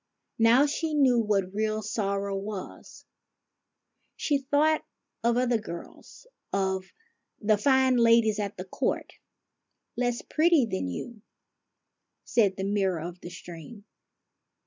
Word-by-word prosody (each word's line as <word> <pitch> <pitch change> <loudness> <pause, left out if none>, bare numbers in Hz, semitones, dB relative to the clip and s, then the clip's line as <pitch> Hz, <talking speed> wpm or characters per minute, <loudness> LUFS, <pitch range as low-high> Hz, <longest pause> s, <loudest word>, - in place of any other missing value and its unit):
Now 235 +5 +6
she 305 +1 -2
knew 260 -5 +4
what 200 -4 0
real 215 +1 -1
sorrow 200 -1 -2
was. 195 0 -7 1.1
She 285 -2 +1
thought 295 +3 +2 0.4
of 235 0 +2
other 245 -2 +2
girls, 170 - -10 0.3
of 190 -1 -1 0.5
the 215 0 +3
fine 265 +1 +4
ladies 230 -2 +4
at 205 -1 -3
the 185 - -6
court, 185 - -2 0.3
— - - -56
" - - -54
Less 245 0 -1
pretty 315 -4 +3
than 95 - -3
you," 215 - -6 1.0
said 205 -5 +2
the 190 - -3
mirror 195 -3 0
of 175 +2 -7
the 175 - -8
stream. 175 +4 -11
215 Hz, 125 wpm, -27 LUFS, 195-245 Hz, 1.1 s, Now